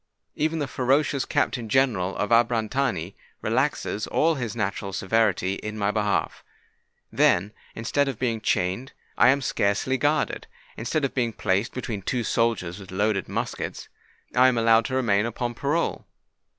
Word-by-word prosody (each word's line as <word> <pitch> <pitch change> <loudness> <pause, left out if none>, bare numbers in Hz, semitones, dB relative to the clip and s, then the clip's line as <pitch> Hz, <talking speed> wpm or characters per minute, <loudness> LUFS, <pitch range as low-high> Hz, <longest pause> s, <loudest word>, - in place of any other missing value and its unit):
Even 160 +2 0
the 145 -3 -1
ferocious 135 +1 +1
Captain 120 -4 -1
General 105 -8 +2
of 105 - -2
Abrantani 115 -5 +1 0.3
relaxes 120 -3 0
all 165 +1 +2
his 120 -6 -4
natural 100 -2 -2
severity 95 -2 +1
in 105 0 -6
my 100 -1 +1
behalf. 105 -2 -1 0.7
Then, 95 +4 +3 0.2
instead 140 +5 0
of 135 -5 -3
being 115 -3 -1
chained, 95 +10 -1 0.2
I - - +6
am 140 +1 +3
scarcely 115 +6 0
guarded: 150 +1 0 0.3
instead 140 +6 -1
of 135 - -3
being 120 -3 0
placed 95 +3 0
between 115 -5 -4
two 120 +6 -1
soldiers 110 -6 0
with 95 -2 -11
loaded 100 +1 0
muskets, - - -4 0.4
I 125 +1 +6
am 130 -2 +2
allowed 115 0 +4
to 130 - -2
remain 110 -4 +2
upon 120 +1 -3
parole. 145 +7 -1
115 Hz, 150 wpm, -25 LUFS, 105-130 Hz, 0.7 s, I